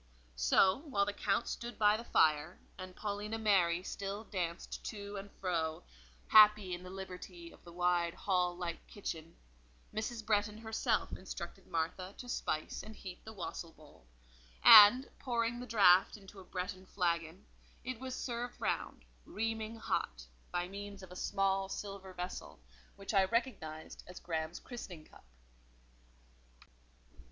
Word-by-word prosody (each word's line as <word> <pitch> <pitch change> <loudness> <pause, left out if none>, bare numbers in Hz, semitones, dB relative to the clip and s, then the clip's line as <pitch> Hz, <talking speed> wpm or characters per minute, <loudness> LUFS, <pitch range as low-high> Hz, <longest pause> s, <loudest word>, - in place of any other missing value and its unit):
So, - - +4
while 200 -6 +2
the 205 - -2
Count 230 - 0
stood 240 +1 -5
by 210 -1 +5
the 225 - -5
fire, 155 -4 +2 0.2
and 185 -1 -9
Paulina 210 +1 -3
Mary 185 -5 +3
still 200 +2 -4
danced 175 -5 -4
to 205 -1 -6
and 195 +1 -7
fro—happy 165 - +3
in 175 - -4
the 180 - -9
liberty 180 -2 -8
of - - -18
the 170 - -12
wide 175 -1 +1
hall 180 -2 0
like 175 -2 -5
kitchen—Mrs. 160 - -7
Bretton 210 0 +1
herself 220 0 -1
instructed - - -8
Martha 180 +4 -3
to 250 - -9
spice 155 -9 -2
and 220 0 -10
heat 185 -3 -9
the 220 - -9
wassail 175 -4 -6
bowl, 145 - -19 0.6
and, 230 +6 +10
pouring 240 -2 -1
the 250 - -7
draught 195 -4 +5
into 195 -1 -13
a - - -10
Bretton 185 +1 -5
flagon, 170 -1 -1 0.4
it 255 -1 -4
was 260 0 -5
served 245 -1 -4
round, - - -2 0.2
reaming 225 +1 -3
hot, - - -2 0.3
by 175 0 -1
means 200 0 -8
of 185 - -11
a - - -9
small 195 0 0
silver 195 -1 -6
vessel, 180 - -6 0.4
which 195 +2 -6
I 195 -2 +5
recognised 190 -9 -3
as 180 - -9
Graham's 160 0 -3
christening 180 -10 -9
cup. - - -18
190 Hz, 140 wpm, -34 LUFS, 170-215 Hz, 0.6 s, and